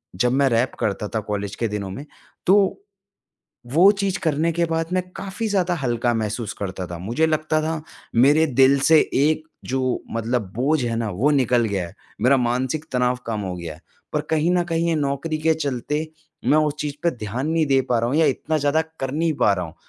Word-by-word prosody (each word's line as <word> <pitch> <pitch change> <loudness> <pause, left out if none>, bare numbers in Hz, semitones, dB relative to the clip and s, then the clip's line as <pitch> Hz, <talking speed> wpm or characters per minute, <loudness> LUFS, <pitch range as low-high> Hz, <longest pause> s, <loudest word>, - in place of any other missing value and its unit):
जब 125 +6 +2
मैं 140 +1 +3
रैप 120 +2 +1
करता 105 0 -1
था - - +2
कॉलेज 100 -1 -3
के 115 - -1
दिनों 100 -2 -4
में, 135 +10 -7 0.4
तो, 195 +1 +4 0.9
वो 170 +11 +6
चीज़ 195 -1 0
करने 160 0 +1
के 170 +1 +1
बाद 165 0 -1
मैं 185 0 +1
काफ़ी 200 +4 -4
ज़्यादा 185 -3 +1
हल्का 120 -1 +1
महसूस 110 0 -2
करता 95 -2 -4
था। 85 0 -7
मुझे 120 - 0
लगता 155 0 0
था, 160 0 -2 0.3
मेरे 145 +7 +5
दिल 135 +1 +4
से 160 -1 +7 0.2
एक 155 +3 +2 0.3
जो 130 -1 0
मतलब 115 -3 -2
बोझ 140 +3 +1
है 115 -1 -1
ना, 115 -2 -2
वो 115 +11 +1
निकल 125 -4 +3
गया 100 -5 -1
है। 85 - -16 0.3
मेरा 130 +3 +5
मानसिक 130 +5 -1
तनाव 125 0 +1
कम 110 -2 -2
हो 95 -2 -4
गया 85 -3 -6
है। 80 - -17 0.3
पर 150 - +1
कहीं 160 +2 +2
न 175 -1 +2
कहीं 170 0 0
ये 165 - +2
नौकरी 145 +2 -1
के 160 +1 +2
चलते, 150 +1 -2 0.4
मैं 155 - +4
उस 150 -1 +1
चीज़ 145 -1 -3
पे 170 - +3
ध्यान 120 +3 -4
नहीं 165 -1 +2
दे 135 -1 +3
पा 120 - +3
रहा 115 +1 0
हूँ, 140 - 0
या 160 - +5
इतना 155 -1 0
ज़्यादा 145 +2 +2 0.2
कर 135 -1 -2
नहीं 160 +2 +1
पा 100 - +5
रहा 90 -2 -2
हूँ। 80 0 -10
135 Hz, 215 wpm, -22 LUFS, 115-160 Hz, 0.9 s, से